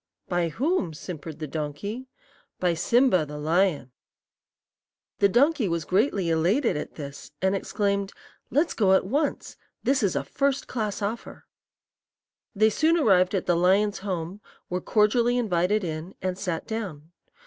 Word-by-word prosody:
"'By 175 -1 0
whom?' 235 - -1
simpered 160 -1 -7
the 155 - -5
donkey. 155 - -5 0.5
"'By 180 -2 +2
Simba, 190 +2 +3
the 150 0 -7
lion.' 160 -3 +1 1.3
"The 200 - +5
donkey 265 - +3
was 170 -2 -2
greatly 195 -3 +1
elated 185 - +2
at 150 - -5
this, 140 -2 -8
and 190 +1 +1
exclaimed: 200 0 -1 0.4
'Let's 300 +5 +1
go 195 -4 +3
at 190 - +3
once. 285 +8 -2 0.3
This 270 +1 +2
is 200 -4 +1
a - - 0
first 280 0 -1
class 215 -4 -3
offer.' 215 +4 -5 1.1
"They 215 +2 +4
soon 320 +9 +3
arrived 190 - +3
at 185 - -1
the 175 - +2
lion's 195 +4 +2
home, 185 0 -4 0.3
were 180 0 -1
cordially 235 +5 +2
invited 205 -2 +1
in, 160 +2 -5
and 185 0 -2
sat 180 -3 -3
down. 180 -9 -5
195 Hz, 145 wpm, -26 LUFS, 170-225 Hz, 1.3 s, The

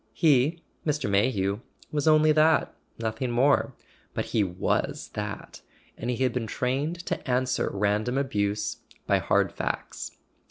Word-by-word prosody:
He, 150 +4 +3 0.2
Mr. 150 -4 0
May¬ 100 +5 +3
hew, 100 -2 -1 0.3
was 150 0 0
only 155 0 +6
that, 155 +1 +4 0.2
nothing 115 +3 -2
more; 130 +4 +3 0.4
but - - -1
he 110 - +1
was 90 -2 -1
that, 105 0 -6 0.3
and 120 - -5
he 125 +1 0
had 125 -2 +1
been 120 -3 -2
trained 145 +10 -2
to - - -3
answer 125 +1 +1
random 105 +5 0
abuse 105 -6 -1 0.3
by - - +3
hard - - +2
facts. - - -4
125 Hz, 145 wpm, -27 LUFS, 105-145 Hz, 0.4 s, only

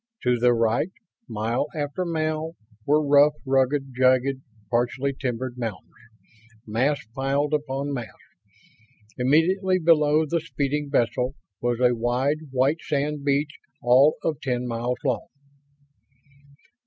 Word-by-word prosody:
To 125 -1 +2
the 120 +1 +4
right, 115 +7 +1 0.4
mile 115 +5 -1
after 150 +4 -2
mile, 155 -1 -2 0.3
were 150 +1 +3
rough, 145 +1 +6
rugged, 135 0 +1
jagged, 130 +1 +2 0.3
partially 125 +3 0
timbered 125 -1 -4
mountains, 110 -8 -5 0.7
mass 125 +6 0
piled 140 +3 0
upon 140 -1 -2
mass. 120 -4 -4 1.1
Immediately 180 +8 +3
below 155 -2 +3
the 170 +3 0
speeding 145 0 -2
vessel 125 0 0 0.3
was 120 -1 0
a 125 -1 +4
wide, 130 +6 -1
white 135 +5 +1
sand 145 0 -2
beach 145 +1 0 0.2
all 130 +5 +5
of 155 -5 -2
ten 125 -2 -2
miles 120 +1 -2
long. 130 -3 -1
135 Hz, 115 wpm, -24 LUFS, 125-150 Hz, 1.1 s, rough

